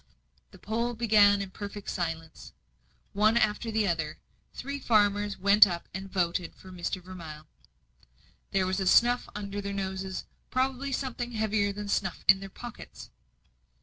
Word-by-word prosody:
The - - -15
poll 235 +3 -2
began 205 -3 +5
in 190 - -9
perfect 205 0 -7
silence. 165 -2 -4 0.6
One 215 +3 +4
after 215 0 +1
the 220 -2 +1
other, 160 -3 -1 0.3
three 280 +2 -5
farmers 205 -4 +2
went 200 +2 +7
up 170 -2 -5
and 190 +1 -6
voted 175 -2 -1
for 185 - -13
Mr. 180 +1 -3
Vermilye. 165 -5 -9 1.1
There 190 -1 +1
was 185 0 -1
snuff 245 +1 +4
under 205 -1 -4
their 200 0 -4
noses 190 -1 -4 0.2
probably 265 +1 -1
something 245 -2 -3
heavier 215 -2 +1
than 205 +1 -6
snuff 195 -2 -1
in 195 0 +7
their 195 0 -8
pockets. 240 +4 -10
200 Hz, 145 wpm, -29 LUFS, 185-220 Hz, 1.1 s, went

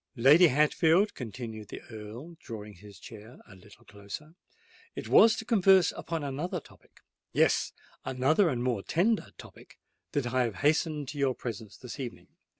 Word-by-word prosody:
Lady 150 +9 +7
Hatfield," 160 +7 +3
continued 110 -3 -7
the - - -9
Earl, 115 +10 -9
drawing 105 -5 -9
his 100 +1 -14
chair 110 +2 -12
a - - -14
little 95 +2 -18
closer, 105 +10 -10 0.6
"it - - -6
was 225 -1 +6
to 225 - -6
converse 195 -6 +4
upon 165 -2 -5
another 145 +5 -3
topic—yes, - - -3 0.3
another 150 +9 +2
and 125 -5 -2
a - - -2
more 120 -5 0
tender 200 - +1
topic—that 145 -4 -8
I 130 -1 +2
have 115 -4 -4
hastened 150 -1 +1
to 145 - -7
your 135 -2 +1
presence 110 -3 -7
this 125 +2 -9
evening." 125 -3 -7
130 Hz, 155 wpm, -29 LUFS, 110-160 Hz, 0.6 s, Lady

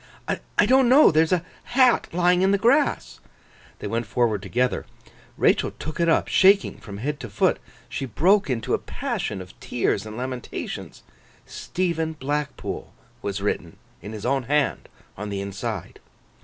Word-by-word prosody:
'I - - 0
don't 260 -1 +5
know. 280 +4 +7
There 155 0 +4
is 160 - +1
a 180 -1 +1 0.3
hat 255 -2 +5
lying 180 +1 +3
in 190 - +4
the 200 - +3
grass.' 265 +8 +2 0.6
They - - -8
went 115 -1 -2
forward 110 -3 +1
together. 125 +6 -1 0.5
Rachael - - +2
took 155 - -6
it 170 0 +3
up, 165 - +3
shaking 195 +1 +4
from 100 -3 -9
head 145 +7 -3
to 115 - -7
foot. 100 - +1 0.3
She 135 - -4
broke 180 - +3
into 125 0 -1
a - - +2
passion 215 - -4
of 90 0 -11
tears 115 -4 -1
and 110 +1 -8
lamentations: 125 0 -6 0.4
Stephen 165 -3 -2
Blackpool 150 0 -4 0.3
was 100 -1 -3
written 85 -5 -2 0.2
in 105 - -8
his 105 0 -7
own 135 0 +1
hand 145 +1 0 0.3
on 105 +2 -5
the 100 -1 -3
inside. 100 0 -5
135 Hz, 160 wpm, -24 LUFS, 110-180 Hz, 0.6 s, know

